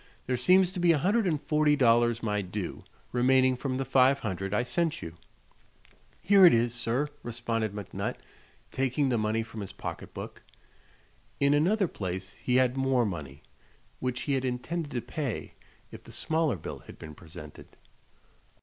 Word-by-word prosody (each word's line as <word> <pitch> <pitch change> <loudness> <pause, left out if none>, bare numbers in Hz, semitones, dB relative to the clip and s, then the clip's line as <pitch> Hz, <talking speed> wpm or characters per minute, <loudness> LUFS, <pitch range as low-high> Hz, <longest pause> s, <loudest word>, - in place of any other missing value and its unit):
There 125 - 0
seems 180 +9 +4
to 185 - -5
be 175 -1 +5
a - - +2
hundred 200 +7 +2
and 155 -4 +1
forty 150 0 +2
dollars 120 -3 +3
my 105 -2 0
due, 95 -1 -5 0.3
remaining 130 +1 +3
from 130 0 -3
the 135 - -2
five 135 +1 +4
hundred 95 -5 -4
I 105 +4 +1
sent 165 +5 -1
you." 80 - -7 1.1
"Here 200 -1 +6
it 175 - +9
is, 115 +1 +1
sir," 125 +4 0
responded 115 -2 -2
McNutt, 105 -2 -4 0.6
taking 135 +1 0
the 120 -3 +1
money 110 +1 0
from 110 -1 -8
his 100 - -6
pocket - - -7
book. - - -8 1.0
In 140 0 +4
another 185 +7 +3
place 95 - -5
he 125 - 0
had 130 0 +3
more 135 -2 +2
money, 75 -8 -6 0.6
which 125 -1 -2
he 145 - -1
had 135 -1 0
intended 140 +6 -3
to 120 - -1
pay 140 -6 -4 0.4
if - - -11
the - - -13
smaller 160 -5 0
bill 85 - -7
had - - -13
been 80 -2 -9
presented. 75 -2 -11
125 Hz, 170 wpm, -28 LUFS, 110-145 Hz, 1.1 s, it